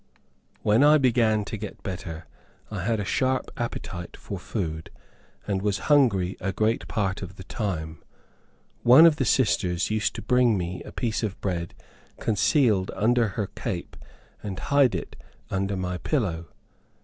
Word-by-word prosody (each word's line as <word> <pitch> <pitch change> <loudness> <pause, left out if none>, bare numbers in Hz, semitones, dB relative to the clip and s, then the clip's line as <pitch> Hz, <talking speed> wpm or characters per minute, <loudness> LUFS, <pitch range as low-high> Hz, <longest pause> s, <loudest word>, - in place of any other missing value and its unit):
When 110 +6 +4
I 150 +1 +7
began 115 -6 +2
to 110 - -5
get 105 0 -8
better, 85 -4 -6 0.5
I 105 -4 -3
had 110 +4 0
a 100 - -2
sharp 130 +5 0
appetite 90 -6 -5
for - - -7
food, 80 -3 -4 0.6
and 100 -2 -1
was 100 -1 0 0.2
hungry 100 -10 +3
a 100 +1 -1
great 110 +3 0
part 100 -3 -1
of 95 0 -7
the 95 - -10
time. 85 -8 -4 0.8
One 130 +7 +8
of 160 -3 +5
the 135 - 0
sisters 95 -7 +1
used 110 -1 0
to - - -6
bring 125 -1 +3
me 90 0 -4
a - - -9
piece 115 -3 -2
of 105 -3 -3
bread 85 -3 -3 0.4
concealed 105 -2 +2
under 115 +3 +3
her 105 -3 -2
cape - - -5 0.5
and 95 -3 -5
hide 140 0 +3
it - - -5 0.4
under 95 0 -1
my 90 -1 -3
pillow. 90 - -1
105 Hz, 155 wpm, -26 LUFS, 95-120 Hz, 0.8 s, One